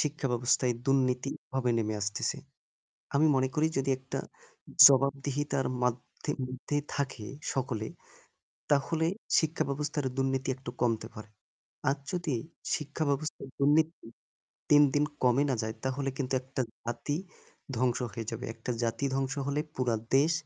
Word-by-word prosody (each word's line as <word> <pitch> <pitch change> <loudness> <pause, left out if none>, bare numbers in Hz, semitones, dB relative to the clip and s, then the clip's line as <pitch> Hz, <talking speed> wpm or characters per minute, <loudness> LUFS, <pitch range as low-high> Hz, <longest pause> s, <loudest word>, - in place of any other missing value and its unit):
শিক্ষা 150 -1 0
ব্যবস্থায় 120 +1 +2
দুর্নীতিভাবে 130 -1 +1
নেমে 110 -1 0
আসতেছে। 105 +1 -1 0.8
আমি 150 +3 +5
মনে 130 0 +3
করি 155 +1 +3
যদি 135 0 0
একটা 130 0 -5 0.7
জবাবদিহিতার 140 0 +1
মাধে 125 0 -2
মধ্যে 130 +3 -4 0.2
থাকে 135 -6 -2 0.3
সকলে, 125 -5 -2 0.8
তাহলে 155 +3 +2 0.3
শিক্ষা 160 0 0
ব্যবস্থার 145 0 -1
দুর্নীতি 135 0 0
একটু 130 -1 -8
কমতে 115 -2 +1
পারে। 105 0 -9 0.6
আর 135 - +2 0.2
যদি 175 -6 -1 0.4
শিক্ষা 150 +1 -3
ব্যবস্থার 140 0 -2
দুর্নীতি 155 +4 +3 0.7
দিন, 145 0 +8
দিন 145 0 +4 0.2
কমে 125 +2 +4
না - - +3
যায় 110 0 -3
তাহলে 135 +1 -1
কিন্তু 135 -1 -1
একটা 130 0 -2 0.2
জাতি 130 +5 -2 0.6
ধ্বংস 125 0 +2
হয়ে 115 +2 -4
যাবে। 115 +2 -5
একটা 115 +2 -6
জাতি 115 +2 0
ধ্বংস 135 0 0
হলে 140 +1 0
পুরা 125 -2 +1 0.2
দেশ 150 +5 +4
135 Hz, 130 wpm, -30 LUFS, 125-145 Hz, 0.8 s, দিন